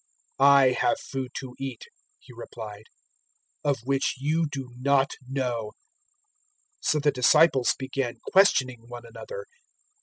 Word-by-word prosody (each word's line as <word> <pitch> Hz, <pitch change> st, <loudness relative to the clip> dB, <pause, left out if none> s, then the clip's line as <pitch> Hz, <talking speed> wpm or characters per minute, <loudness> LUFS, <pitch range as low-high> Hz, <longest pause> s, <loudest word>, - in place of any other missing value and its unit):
004:032 135 Hz, -, +6 dB
"I 140 Hz, -2 st, +7 dB
have 145 Hz, -, +2 dB
food 130 Hz, -2 st, -5 dB
to 130 Hz, -2 st, -6 dB
eat," 135 Hz, -3 st, -5 dB, 0.3 s
He -, -, -16 dB
replied, 105 Hz, -1 st, -9 dB, 0.8 s
"of 145 Hz, -2 st, +1 dB
which 135 Hz, +2 st, 0 dB
you 155 Hz, +4 st, 0 dB
do 135 Hz, -3 st, -6 dB
not 135 Hz, +1 st, +2 dB, 0.2 s
know." 125 Hz, -5 st, -3 dB, 1.1 s
004:033 -, -, -12 dB
So 155 Hz, -, +2 dB
the 145 Hz, 0 st, +2 dB
disciples 135 Hz, 0 st, +4 dB
began 130 Hz, -2 st, -3 dB, 0.2 s
questioning 130 Hz, -11 st, +3 dB
one 120 Hz, 0 st, -9 dB
another. 480 Hz, -, -8 dB
135 Hz, 130 wpm, -26 LUFS, 125-140 Hz, 1.1 s, I